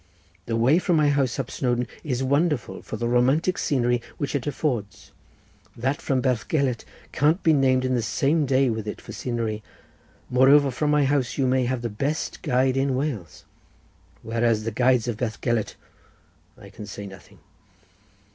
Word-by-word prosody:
The 115 Hz, -, -1 dB
way 125 Hz, +9 st, +4 dB
from 180 Hz, -2 st, +1 dB
my 150 Hz, -2 st, +4 dB
house 140 Hz, -4 st, +1 dB
up 135 Hz, -3 st, -4 dB
Snowdon 125 Hz, -1 st, 0 dB, 0.2 s
is 130 Hz, -4 st, -2 dB
wonderful 145 Hz, 0 st, 0 dB
for -, -, -6 dB
the 120 Hz, -, -2 dB
romantic 135 Hz, +9 st, +2 dB
scenery 120 Hz, -3 st, +1 dB, 0.2 s
which 140 Hz, -3 st, -3 dB
it 140 Hz, -1 st, -2 dB
affords; 125 Hz, -8 st, -3 dB, 0.7 s
that 130 Hz, +5 st, -1 dB
from 130 Hz, -2 st, 0 dB
Bethgelert 130 Hz, +1 st, 0 dB, 0.3 s
can't 155 Hz, +7 st, +2 dB
be 160 Hz, -, +5 dB
named 130 Hz, -2 st, +3 dB
in 130 Hz, -, 0 dB
the 120 Hz, -, +1 dB
same 140 Hz, +7 st, +1 dB
day 135 Hz, +1 st, +3 dB
with 110 Hz, -1 st, -4 dB
it 105 Hz, -, -5 dB
for -, -, -11 dB
scenery; 115 Hz, -3 st, -3 dB, 0.7 s
moreover, 135 Hz, +2 st, +5 dB
from 150 Hz, +4 st, -1 dB
my 150 Hz, -1 st, +3 dB
house 135 Hz, -3 st, 0 dB
you 135 Hz, -, +2 dB
may 130 Hz, 0 st, +2 dB
have 125 Hz, -1 st, -2 dB
the -, -, 0 dB
best 140 Hz, +8 st, -3 dB
guide 130 Hz, +1 st, +1 dB
in 135 Hz, -1 st, +1 dB
Wales; 125 Hz, -, -4 dB, 0.8 s
whereas 115 Hz, -1 st, 0 dB
the 115 Hz, -, -2 dB
guides 125 Hz, +1 st, +2 dB
of 120 Hz, -3 st, -2 dB
Bethgelert—but 115 Hz, -1 st, -6 dB
I -, -, -5 dB
say 105 Hz, -1 st, -8 dB
nothing. 95 Hz, -1 st, -13 dB
130 Hz, 165 wpm, -24 LUFS, 120-140 Hz, 0.8 s, be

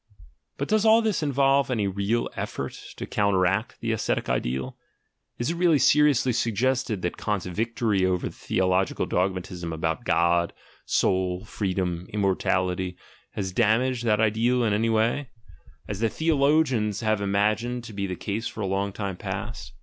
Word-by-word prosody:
But 140 Hz, -, -2 dB
does 215 Hz, -1 st, +2 dB
all 225 Hz, +1 st, +6 dB
this 215 Hz, -5 st, 0 dB
involve 140 Hz, -2 st, +2 dB
any 110 Hz, -5 st, 0 dB
real 100 Hz, +4 st, 0 dB
effort -, -, -4 dB, 0.3 s
to -, -, -4 dB
counteract 100 Hz, +1 st, +1 dB
the 115 Hz, -, -1 dB
ascetic 110 Hz, -, -1 dB
ideal? 65 Hz, +1 st, -2 dB, 0.6 s
Is 120 Hz, +7 st, -1 dB
it 170 Hz, -, -4 dB
really 170 Hz, -3 st, +4 dB
seriously 140 Hz, -3 st, +4 dB
suggested 115 Hz, -2 st, 0 dB
that 90 Hz, -, -2 dB
Kant's 105 Hz, -4 st, -2 dB
victory 110 Hz, +1 st, 0 dB
over 90 Hz, -1 st, +1 dB
the -, -, -8 dB
theological 95 Hz, +1 st, 0 dB
dogmatism 90 Hz, -2 st, -2 dB
about 80 Hz, -1 st, -2 dB
"God," 85 Hz, 0 st, +2 dB, 0.3 s
"Soul," 95 Hz, +1 st, +1 dB
"Freedom," 90 Hz, -4 st, -2 dB
"Immortality," 90 Hz, -2 st, 0 dB, 0.4 s
has 95 Hz, -3 st, -3 dB
damaged 120 Hz, +3 st, +2 dB
that 105 Hz, -2 st, +3 dB
ideal 115 Hz, +3 st, +2 dB
in 110 Hz, -3 st, +2 dB
any 115 Hz, +2 st, +1 dB
way 115 Hz, +5 st, +1 dB, 0.6 s
(as 105 Hz, -2 st, -4 dB
the 115 Hz, 0 st, +2 dB
theologians 140 Hz, -8 st, +2 dB
have 110 Hz, -2 st, +1 dB
imagined 110 Hz, +5 st, 0 dB
to 115 Hz, -, -9 dB
be 100 Hz, -1 st, -2 dB
the 90 Hz, -, -3 dB
case 105 Hz, +5 st, -3 dB
for 110 Hz, -, -7 dB
a -, -, -1 dB
long 100 Hz, +1 st, -1 dB
time 100 Hz, -2 st, -4 dB
past)? 65 Hz, -, -5 dB
105 Hz, 155 wpm, -25 LUFS, 95-120 Hz, 0.6 s, all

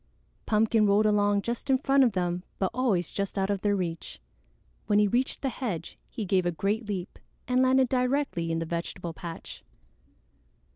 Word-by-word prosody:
Pumpkin 215 Hz, 0 st, +3 dB
rolled 205 Hz, +2 st, +4 dB
along 205 Hz, -1 st, +2 dB
just 235 Hz, +3 st, -4 dB
in 265 Hz, -, +5 dB
front 275 Hz, +1 st, +3 dB
of 240 Hz, -5 st, +2 dB
them 180 Hz, -1 st, -1 dB, 0.2 s
but 190 Hz, -, 0 dB
always 225 Hz, -9 st, 0 dB
just 200 Hz, 0 st, -3 dB
out 195 Hz, +1 st, +1 dB
of 200 Hz, -2 st, -2 dB
their 205 Hz, -1 st, +2 dB
reach. 170 Hz, -3 st, -4 dB, 0.7 s
When 205 Hz, -, +3 dB
he 210 Hz, 0 st, +5 dB
reached 250 Hz, +8 st, -1 dB
the 270 Hz, -, +1 dB
hedge, 205 Hz, -11 st, -4 dB
he 220 Hz, -, -5 dB
gave 185 Hz, -1 st, +2 dB
a -, -, +1 dB
great 205 Hz, +7 st, -1 dB
leap 190 Hz, -3 st, -4 dB, 0.3 s
and 250 Hz, +1 st, +2 dB
landed 260 Hz, 0 st, +4 dB
directly 250 Hz, -9 st, 0 dB
in 165 Hz, -, 0 dB
the 165 Hz, -, -2 dB
vegetable 170 Hz, +1 st, -4 dB
patch. 165 Hz, 0 st, -9 dB
205 Hz, 180 wpm, -28 LUFS, 180-245 Hz, 0.7 s, in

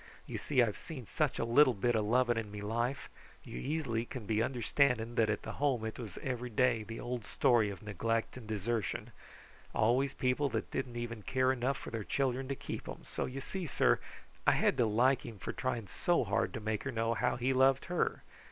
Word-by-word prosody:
You -, -, -5 dB
see, 130 Hz, -4 st, +3 dB
I've 105 Hz, -3 st, -1 dB
seen 135 Hz, -7 st, -7 dB
such 150 Hz, +5 st, 0 dB
a -, -, 0 dB
little 130 Hz, +2 st, +5 dB
bit 120 Hz, +5 st, +1 dB
of 110 Hz, -2 st, +2 dB
loving 120 Hz, +2 st, +3 dB
in 110 Hz, -2 st, -2 dB
me 105 Hz, 0 st, -7 dB
life. 120 Hz, +6 st, -1 dB, 0.4 s
You -, -, -7 dB
easily 130 Hz, -, -1 dB
can 120 Hz, -2 st, -7 dB
be 110 Hz, +1 st, +1 dB
understanding 120 Hz, -1 st, +1 dB
that 115 Hz, -3 st, +3 dB
at 105 Hz, -, -1 dB
the -, -, -4 dB
Home 130 Hz, -6 st, +2 dB
it 110 Hz, -, -5 dB
was 110 Hz, -7 st, -7 dB
every 125 Hz, -2 st, -2 dB
day 120 Hz, 0 st, +2 dB
the 115 Hz, +2 st, -7 dB
old 120 Hz, -2 st, -3 dB
story 115 Hz, -1 st, +3 dB
of 100 Hz, -2 st, -8 dB
neglect 115 Hz, +3 st, -1 dB
and 125 Hz, -4 st, -9 dB
desertion. 110 Hz, 0 st, -2 dB, 0.6 s
Always 130 Hz, +5 st, +2 dB
people 130 Hz, +3 st, +1 dB
that -, -, -3 dB
didn't 130 Hz, -3 st, -3 dB
even 120 Hz, -2 st, -4 dB
care 130 Hz, +4 st, +2 dB
enough 130 Hz, +1 st, 0 dB
for -, -, -8 dB
their 115 Hz, -2 st, -3 dB
children 135 Hz, +2 st, 0 dB
to 140 Hz, -, -2 dB
keep -, -, -6 dB
them, -, -, -7 dB
so -, -, -3 dB
you 135 Hz, +2 st, -5 dB
see, 185 Hz, +4 st, -4 dB
sir, -, -, +3 dB, 0.5 s
I -, -, +7 dB
had -, -, +3 dB
to 120 Hz, -, +4 dB
like 125 Hz, +5 st, +3 dB
him 115 Hz, -, -8 dB
for 95 Hz, -, -5 dB
trying 120 Hz, -4 st, -2 dB
so 175 Hz, -, +1 dB
hard 100 Hz, -3 st, 0 dB
to -, -, -2 dB
make 110 Hz, -1 st, -2 dB
her 140 Hz, -, -2 dB
know 115 Hz, -1 st, 0 dB
how -, -, +1 dB
he 125 Hz, +2 st, +1 dB
loved 130 Hz, +1 st, +4 dB
her. 175 Hz, 0 st, -1 dB
120 Hz, 215 wpm, -33 LUFS, 110-130 Hz, 0.6 s, I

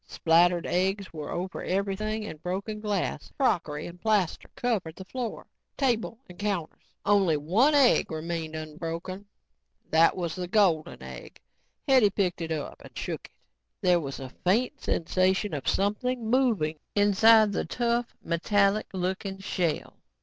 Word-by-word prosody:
Splattered 170 Hz, +1 st, +3 dB
eggs 190 Hz, +1 st, 0 dB
were 150 Hz, -2 st, -6 dB
over 185 Hz, +2 st, -4 dB
everything 205 Hz, +3 st, -1 dB
and 155 Hz, -7 st, -8 dB
broken 200 Hz, +5 st, -3 dB
glass, 205 Hz, -3 st, -2 dB
crockery 165 Hz, -, 0 dB
and 175 Hz, +1 st, -10 dB
plaster 210 Hz, -6 st, +1 dB
covered 200 Hz, -10 st, -1 dB
the 190 Hz, -, -9 dB
floor, 245 Hz, +2 st, -5 dB, 0.3 s
table 235 Hz, -4 st, 0 dB
and 180 Hz, -, -14 dB
counters. 195 Hz, -6 st, -4 dB
Only 195 Hz, -6 st, +4 dB
one 210 Hz, -, +3 dB
egg 275 Hz, -4 st, +5 dB
remained 160 Hz, 0 st, -4 dB
unbroken. 165 Hz, +5 st, -6 dB, 0.6 s
That 165 Hz, +3 st, +5 dB
was 170 Hz, -3 st, -2 dB
the 180 Hz, +1 st, -4 dB
golden 180 Hz, -6 st, +2 dB
egg. -, -, -10 dB, 0.5 s
Hetty 260 Hz, -6 st, +6 dB
picked 185 Hz, -3 st, -1 dB
it 165 Hz, -1 st, -3 dB
up 155 Hz, -2 st, -4 dB
and -, -, -13 dB
shook -, -, -4 dB
it. -, -, -35 dB, 0.5 s
There 180 Hz, -1 st, +4 dB
was 140 Hz, -4 st, -5 dB
a 130 Hz, -1 st, -7 dB
faint 245 Hz, +10 st, +1 dB
sensation 185 Hz, +3 st, +1 dB
of 140 Hz, -3 st, -4 dB
something 225 Hz, +3 st, 0 dB
moving 215 Hz, -, +2 dB, 0.2 s
inside 210 Hz, +1 st, +6 dB
the -, -, -1 dB
tough, 235 Hz, +5 st, -1 dB
metallic 200 Hz, +5 st, +2 dB
looking 190 Hz, +1 st, -2 dB
shell. 180 Hz, -4 st, -2 dB
190 Hz, 140 wpm, -27 LUFS, 165-215 Hz, 0.6 s, Hetty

